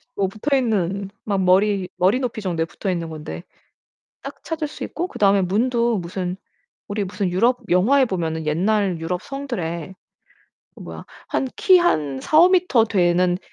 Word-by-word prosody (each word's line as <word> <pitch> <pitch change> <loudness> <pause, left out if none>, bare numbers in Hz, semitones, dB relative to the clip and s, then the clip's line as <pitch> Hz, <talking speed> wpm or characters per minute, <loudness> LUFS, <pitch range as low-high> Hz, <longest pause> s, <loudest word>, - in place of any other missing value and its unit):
뭐 195 - +1
붙어있는 205 -5 -1 0.2
막 200 -3 0
머리 190 0 +2
머리 190 +7 +3
높이 245 -4 -3
정도에 170 -4 -1
붙어 195 +4 -5
있는 170 -2 -2
건데 155 +2 -7 0.8
딱 - - -9
찾을 315 -2 -3
수 300 - -7
있고 350 +2 -4
그다음에 200 - +2
문도 235 +4 +1
무슨 180 +1 -4 0.5
우리 205 0 -2
무슨 195 0 -2
유럽 235 +8 +2
영화에 245 +10 +4
보면은 160 -6 -3
옛날 190 +3 +1
유럽 175 +2 -3
성들에 190 - -5 0.8
어 - - -15
뭐야? - - -9 0.2
한 - - -1
키 370 -2 +6
한 150 - 0
4-5m 340 - +4
되는 180 -3 +2
195 Hz, 280 characters per minute, -21 LUFS, 175-240 Hz, 0.8 s, 키